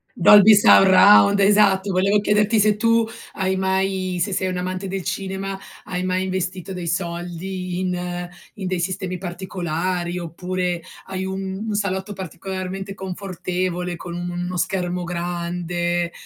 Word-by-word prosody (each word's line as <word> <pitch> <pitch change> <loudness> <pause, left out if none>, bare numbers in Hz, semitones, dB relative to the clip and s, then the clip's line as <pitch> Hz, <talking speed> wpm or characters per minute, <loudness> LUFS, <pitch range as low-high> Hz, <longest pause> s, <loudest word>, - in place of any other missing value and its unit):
Dolby 210 +4 +8
Surround, 200 0 +7
esatto. 200 -1 +4
Volevo 195 +3 +3
chiederti 210 +1 +2
se 210 0 +4
tu 230 +1 +3 0.3
hai 190 -1 -1
mai 190 -1 -1
se 200 +3 0
sei 185 - 0
un'amante 185 +1 -3
del 190 0 -3
cinema, 195 0 -4 0.3
hai 180 0 -3
mai 185 0 0
investito 185 0 -3
dei 180 -2 -5
soldi 175 +1 -3
in 180 -1 -3 0.3
in 190 -3 -5
dei 185 -1 -1
sistemi 185 +1 -3
particolari 175 -1 -3
oppure 180 +1 -3 0.2
hai 190 0 -4
un 190 0 -4
un 215 - -2
salotto 200 0 -2
particolarmente 190 +2 -6
confortevole 180 -2 -4
con 170 0 -8
un 175 0 -4
uno 175 +1 -4
schermo 180 0 -1
grande? 175 0 -2
185 Hz, 135 wpm, -22 LUFS, 175-195 Hz, 0.3 s, Dolby